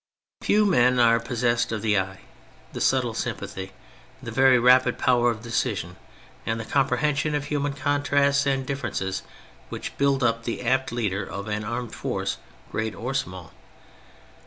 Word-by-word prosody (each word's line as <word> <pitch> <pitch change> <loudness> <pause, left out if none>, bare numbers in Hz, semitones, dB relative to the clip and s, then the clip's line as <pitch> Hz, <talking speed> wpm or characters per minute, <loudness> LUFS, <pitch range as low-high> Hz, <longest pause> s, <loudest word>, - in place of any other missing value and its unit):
Few 210 0 +3
men 125 -10 +4
are 115 -1 +5
possessed 120 -1 0
of 110 -2 -3
the 105 -3 +3
eye, 95 0 -5 0.5
the - - -5
^subtle 125 -4 +1
sympathy, 95 -3 -4 0.5
the - - -7
very 130 -1 +5
rapid 125 +1 +5
power 120 -1 +3
of 110 -1 -4
decision, 115 -7 -2 0.5
and 115 +1 -2
the 110 - -5
comprehension 150 +3 +1
of 145 -1 -2
human 145 -1 -1
contrasts 140 0 +1
and 135 -1 0
differences 120 -8 -3 0.5
which - - -6
build 140 -1 +2
up 115 -1 +1
the 115 +1 -4
apt 130 +1 +1
leader 105 -4 -1
of 100 +2 -6
an 105 0 -2
armed 120 +2 -4
force - - -3 0.3
great 110 0 -2
or 125 +4 -4
small. 95 -11 -4
120 Hz, 155 wpm, -25 LUFS, 110-140 Hz, 0.5 s, are